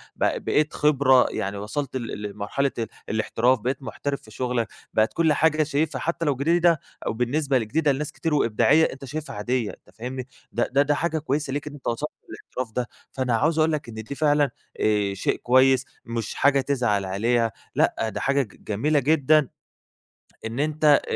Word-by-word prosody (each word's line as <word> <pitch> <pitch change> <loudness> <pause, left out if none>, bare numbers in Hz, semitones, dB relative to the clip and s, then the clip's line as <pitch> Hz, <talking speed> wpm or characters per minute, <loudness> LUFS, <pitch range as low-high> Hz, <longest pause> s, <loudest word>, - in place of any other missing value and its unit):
ب - - 0
بقيت 150 0 +2
خبرة 135 -4 +4
يعني 100 +1 -3
وصَلت 130 +7 -3
ل 115 -4 -5
لمرحلة 105 +7 -2
ال 115 - -1 0.2
الاحتراف 115 +4 +2
بقيت 130 +5 -2
محترف 140 +1 -4
في 110 - -16
شغلك، 120 0 -1 0.3
بقت 110 +1 +2
كل 165 -2 +3
حاجة 155 +1 +3
شايفها 150 -2 -1
حتى 170 0 -1
لو 145 -3 +2
جديدة 165 +4 +3 0.3
أو - - 0
بالنسبة 130 +4 +1
ل 115 -3 -2
جديدة 150 +5 +2
لناس 140 +2 -2
كتير 165 - -2
وإبداعية، 145 +4 +4
أنت 135 +1 -10
شايفها 150 +1 -5
عادية 115 +2 -1
أنت 90 - -19
فاهمني، 125 +3 -5 0.2
ده 120 - 0
ده 135 +2 +4
ده 145 +1 +2
حاجة 160 +1 -1
كويسة 145 -1 -2
ليك 145 +1 -3
إن 150 - -6
أنت 145 - -9
وصَلت 130 +6 -1 0.2
الاحتراف 125 -3 -6
ده، 125 -1 -1 0.2
فأنا 130 -3 0
عاوز 155 +7 +2
أقول 160 +1 +4
لك 150 -4 -2
إن - - -8
دي 110 +5 -6
فعلًا 145 -1 +3 0.3
آآ 105 -2 +2
شيء 100 - 0
كويس 130 +1 +4 0.2
مش 115 -1 -4
حاجة 140 -1 +4
تزعل 120 -8 0
عليها 115 +4 +1 0.2
لأ 110 - +1
ده - - -5
حاجة 140 +1 +2
ج 110 -7 -9
جميلة 145 +9 +1
جدًا 150 +1 +3 1.0
إن 115 +4 -3
أنت 155 +1 -1
آآ 145 -2 +7
135 Hz, 185 wpm, -24 LUFS, 115-150 Hz, 1.0 s, آآ